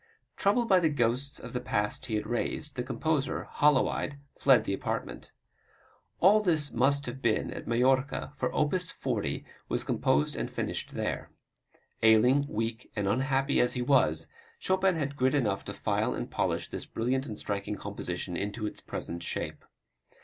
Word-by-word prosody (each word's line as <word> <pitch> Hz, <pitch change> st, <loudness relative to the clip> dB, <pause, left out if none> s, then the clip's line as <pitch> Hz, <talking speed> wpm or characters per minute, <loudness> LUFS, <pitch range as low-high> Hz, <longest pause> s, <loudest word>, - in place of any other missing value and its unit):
Troubled 230 Hz, +4 st, +2 dB
by 190 Hz, -3 st, +6 dB
the 165 Hz, -3 st, +3 dB
ghosts 130 Hz, 0 st, 0 dB
of -, -, -9 dB
the 125 Hz, -, -1 dB
past 105 Hz, +1 st, -1 dB
he 110 Hz, -, -1 dB
had 105 Hz, -, -1 dB
raised, 120 Hz, +5 st, -2 dB
the 125 Hz, -, -1 dB
composer, 135 Hz, +4 st, -1 dB
hollow 145 Hz, -3 st, +3 dB
eyed, 145 Hz, -, -3 dB, 0.2 s
fled 135 Hz, -4 st, +5 dB
the -, -, -2 dB
apartment. 95 Hz, -, -4 dB, 0.9 s
All 200 Hz, +4 st, +6 dB
this 160 Hz, -7 st, +2 dB
must 140 Hz, +4 st, +2 dB
have 125 Hz, +2 st, -6 dB
been 110 Hz, -2 st, +1 dB
at -, -, -8 dB
Majorca, 130 Hz, +5 st, +1 dB
for 135 Hz, -, -1 dB
op. 150 Hz, +2 st, +1 dB
40 125 Hz, -, -2 dB, 0.2 s
was -, -, 0 dB
composed 75 Hz, +1 st, +1 dB
or -, -, -2 dB
finished -, -, -4 dB
there. -, -, -2 dB, 0.7 s
Ailing, 125 Hz, +6 st, +5 dB
weak 115 Hz, +1 st, -3 dB
and 105 Hz, -2 st, -1 dB
unhappy 135 Hz, +5 st, +1 dB
as 125 Hz, -, +3 dB
he 125 Hz, -, -1 dB
was, 80 Hz, -, +3 dB, 0.3 s
Chopin 190 Hz, -1 st, +2 dB
had 145 Hz, -3 st, -2 dB
grit 130 Hz, +1 st, +2 dB
enough 105 Hz, -8 st, +1 dB
to -, -, -5 dB
file -, -, 0 dB
and -, -, -5 dB
polish -, -, -1 dB
this -, -, -5 dB
brilliant 130 Hz, +4 st, -1 dB
and 105 Hz, -3 st, -6 dB
striking 100 Hz, 0 st, -3 dB
composition 90 Hz, -3 st, -4 dB
into 105 Hz, +4 st, -3 dB
its 105 Hz, -, -5 dB
present 85 Hz, 0 st, -5 dB
shape. -, -, -4 dB
130 Hz, 165 wpm, -29 LUFS, 110-145 Hz, 0.9 s, by